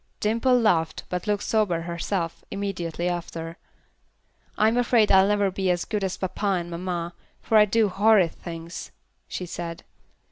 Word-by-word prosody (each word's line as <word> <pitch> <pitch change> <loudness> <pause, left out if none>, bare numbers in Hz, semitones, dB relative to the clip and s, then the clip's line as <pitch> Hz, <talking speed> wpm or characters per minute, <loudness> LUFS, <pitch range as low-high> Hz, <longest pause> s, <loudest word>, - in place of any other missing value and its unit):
Dimple 230 +4 +2
laughed, 170 -8 +1
but 180 +2 -3
looked 205 -1 0
sober 205 -7 +1
herself, 170 0 -3
immediately 180 -4 -3
after. 170 -1 -4 1.0
"I'm 220 +2 +3
afraid 240 -3 +3
I'll 190 0 +6
never 205 -1 +2
be 190 0 -1
as 175 -1 +1
good 210 -2 -2
as 190 -1 -2
papa 190 +2 -5 0.2
and 175 0 -7
mamma, 175 0 -3 0.3
for 225 - -1
I 210 -1 +8
do 220 +1 +2
horrid 200 -3 +4
things," 165 0 -8 0.4
she 180 - -5
said. 170 -1 -6
185 Hz, 150 wpm, -25 LUFS, 170-210 Hz, 1.0 s, I